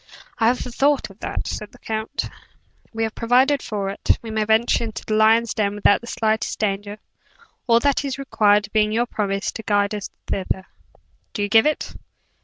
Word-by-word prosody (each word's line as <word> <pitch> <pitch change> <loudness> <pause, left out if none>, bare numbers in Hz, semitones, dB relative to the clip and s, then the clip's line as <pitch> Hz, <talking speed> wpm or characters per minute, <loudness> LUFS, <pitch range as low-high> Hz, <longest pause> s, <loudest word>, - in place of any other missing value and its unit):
"I 225 - +4
have 245 +2 +3
thought 270 0 0
of 195 - -19
that," - - -4
said 210 - -6
the - - -15
count, 220 +5 -3 0.7
"and 225 - -5
have 220 - -2
provided 255 +4 +3
for 205 -3 -3
it. 195 - 0
We 225 - -6
may 215 -1 0
venture 220 +2 +2
in 220 - -6
the 220 - -4
lion's 220 +1 +4
den 205 -1 0
without 205 0 +3
the 235 - -11
slightest 220 -1 -1
danger: 205 0 -2 0.7
all 230 -1 +5
that 285 0 +2
is 275 -2 -3
required 210 -6 +2
being 215 -1 +3
your 235 +2 +1
promise 200 -4 -2
to - - -7
guide 205 -1 +1
us 210 -2 -4 0.2
thither. 190 0 -2 0.7
Do 205 - -2
you 205 - -1
give 225 +5 +5
it?" 305 - -2
220 Hz, 190 wpm, -22 LUFS, 205-235 Hz, 0.7 s, all